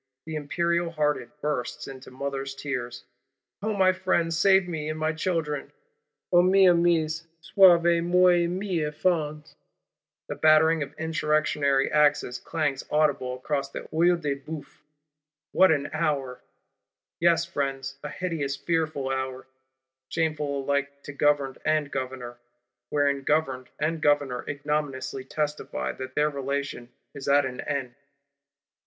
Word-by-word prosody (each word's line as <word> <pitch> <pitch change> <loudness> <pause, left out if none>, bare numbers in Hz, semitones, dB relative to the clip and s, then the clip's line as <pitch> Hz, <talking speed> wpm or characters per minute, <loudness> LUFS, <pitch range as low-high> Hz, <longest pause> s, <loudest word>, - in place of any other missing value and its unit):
The 160 - -6
Imperial 170 +3 0
hearted 150 -2 -1
bursts 150 -5 -3
into 130 -1 -10
mother's 135 +1 -4
tears: 125 -4 -5 0.6
'O 215 +1 -1
my 190 -1 +4
friends, 185 -3 0
save 190 +2 +4
me 155 -3 -4
and 155 - -3
my 155 0 0
children, 155 -3 -2 0.6
O 175 - +7
mes 190 +1 +5
amis, 165 -1 +1
sauvez 170 -1 +5
moi 180 +1 +5
et 175 -1 +3
mes 180 -1 -2
enfans!' 150 -1 -1 0.7
The - - -3
battering 155 +1 +4
of 145 0 -5
Insurrectionary 150 -4 +1
axes 145 -4 +2
clangs 150 -5 -2
audible 145 -4 +1
across 140 +1 -2
the - - -6
Œil 170 +2 +3
de 145 -4 -2
Bœuf. 145 +1 -9 0.7
What 190 -1 +5
an 145 -2 +1
hour! 140 -5 -1 0.8
Yes, 170 -1 +3
Friends: 135 -4 -3
a - - -4
hideous 160 -6 -3
fearful 155 -4 -1
hour; 130 -1 -3 0.6
shameful 150 -4 -1
alike 140 0 -2
to 145 - -8
Governed 140 -2 +1
and 155 -2 +1
Governor; 125 -2 -5 0.5
wherein 140 -1 +1
Governed 135 -3 0
and 155 +2 -1
Governor 145 -5 +1
ignominiously 145 -2 -3
testify 145 - -3
that 130 - -8
their 150 0 +2
relation 140 -3 -4 0.2
is 140 -2 -8
at 140 0 +4
an 125 -1 -5
end. 135 -4 -3
150 Hz, 130 wpm, -26 LUFS, 140-165 Hz, 0.8 s, O